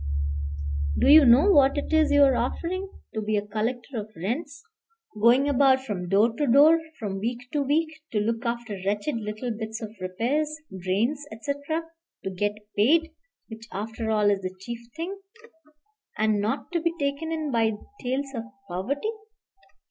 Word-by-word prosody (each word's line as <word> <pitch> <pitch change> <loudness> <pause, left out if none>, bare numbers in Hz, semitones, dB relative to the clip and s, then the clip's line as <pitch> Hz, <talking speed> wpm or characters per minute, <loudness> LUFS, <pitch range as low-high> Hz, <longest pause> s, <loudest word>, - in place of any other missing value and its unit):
Do - - +3
you 300 0 +9
know 260 +11 +7
what 280 -4 +5
it 290 - -3
is 315 -1 +4
you 285 0 +6
are 270 -2 +5
offering? 370 +10 -2 0.2
to 220 - -2
be 215 0 0
a 205 - -2
collector 235 +4 -3
of 210 0 -7
rents, 280 - -4 0.6
going 245 +5 +5
about 270 -1 +4
from 180 -7 -4
door 210 +4 +4
to 295 - +1
door, 295 +6 +7 0.2
from 195 -3 -4
week 235 +4 -2 0.2
to 295 - +1
week; 310 +3 0
to 215 - +1
look 225 +2 -1
after 235 -4 -3
wretched 205 +7 -1
little 215 +3 -4
bits 220 0 -5
of 220 -2 -7
repairs, 265 +12 -1 0.2
drains, 205 +11 0
etc.; 285 +8 -3 0.4
to 190 - -3
get 205 +2 -1 0.2
paid, 320 +10 +3 0.4
which, 225 0 -10
after 220 +2 -4
all, 210 -2 +3
is 200 -1 0
the 185 0 -5
chief 235 +4 -5 0.2
thing, 365 +5 -5 1.0
and 215 -1 +2
not 215 - -2
to 340 -2 0
be 335 0 0
taken 280 +3 -2
in 310 -3 -2
by 225 -2 +2 0.3
tales 270 +2 -2
of 230 -3 -4 0.2
poverty." 255 - -2
240 Hz, 165 wpm, -26 LUFS, 215-290 Hz, 1.0 s, you